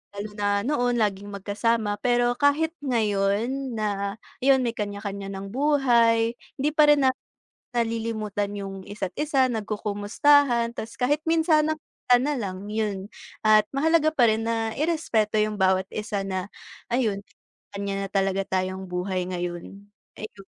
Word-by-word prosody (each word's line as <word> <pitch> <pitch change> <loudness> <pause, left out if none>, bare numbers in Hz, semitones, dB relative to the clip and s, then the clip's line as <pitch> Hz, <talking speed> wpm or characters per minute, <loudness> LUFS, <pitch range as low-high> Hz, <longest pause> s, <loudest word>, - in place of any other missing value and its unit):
lalo 205 +1 -5
na 205 0 +1
noon, 245 -2 +1
laging 205 -1 -1
magkasama 205 +2 -1
pero 245 +1 +2
kahit 300 +3 +3
ngayon 230 +2 0
na, 200 -2 -2 0.3
yun, 265 -1 +5
may 235 - 0
kanya-kanya 200 -1 -4
ng 195 0 -7
buhay, 235 -4 +3 0.3
hindi 290 - +2
pa 300 -1 +5
rin 290 -2 +4
namin 260 - 0 0.6
nalilimutan 225 -3 -2
yung 195 -1 -6
isa't 200 -3 -5
isa. 285 -4 +2
Nagkukumustahan, 230 +4 +2
tas 225 +1 -7
kahit 290 +5 +1
minsan 320 -1 +3
na 315 - +1
pagkikita 250 -4 +1
na 295 +1 0
lang, 195 -3 -5
yun. 210 -3 -2 0.4
At 215 0 +7
mahalaga 310 +2 +3
pa 245 -6 +5
rin 220 +1 0
na 225 -1 -1
irespeto 275 -10 +1
yung 215 0 +1
bawat 190 0 +3
isa 210 -2 -2
na, 190 +1 -3 0.4
ayun, 220 -5 0
na - - -55
may 180 - -32 0.4
kaniya-kaniya 200 0 -3
na - - -10
talaga 195 0 +1
tayong 190 0 -2
buhay 180 0 -2
ngayon, 180 +3 -6 0.3
ayun. 205 -2 -9
215 Hz, 150 wpm, -25 LUFS, 200-255 Hz, 0.6 s, At